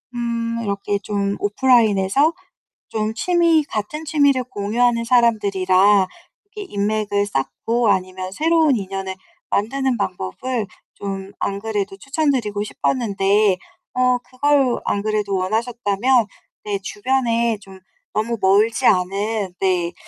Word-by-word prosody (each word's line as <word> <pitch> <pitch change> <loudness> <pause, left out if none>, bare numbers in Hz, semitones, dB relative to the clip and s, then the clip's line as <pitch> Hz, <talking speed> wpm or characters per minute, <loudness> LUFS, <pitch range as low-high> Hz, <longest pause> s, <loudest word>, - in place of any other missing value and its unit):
음 230 -1 -2
이렇게 200 -1 -1
좀 200 0 -2
오프라인에서 225 - +3 0.6
좀 215 0 -2
취미 335 +4 +3
같은 290 +5 -5
취미를 285 -4 +3
공유하는 235 +1 0
사람들이라 200 -5 +3 0.5
이렇게 415 -2 -8
인맥을 205 0 0
쌓고 205 - -1
아니면 185 -1 -1
새로운 320 0 +3
인연을 195 -2 -4 0.3
만드는 260 +4 0
방법을 205 - -3 0.3
좀 195 -1 -6
안 200 0 -2
그래도 205 -2 -3
추천 285 +7 0
드리고 210 -6 -1
싶었는데 205 -4 +1 0.4
어 250 0 +3
그걸 255 +1 +1
안 200 - 0
그래도 210 -2 -1
원하셨다면 225 +3 +1 0.4
네 205 -1 -2
주변에 235 0 0
좀 195 -2 -14 0.3
너무 230 +2 -1
멀지 210 +6 +3
않은 195 +1 +1
네 180 -2 0
215 Hz, 265 characters per minute, -20 LUFS, 200-250 Hz, 0.6 s, 오프라인에서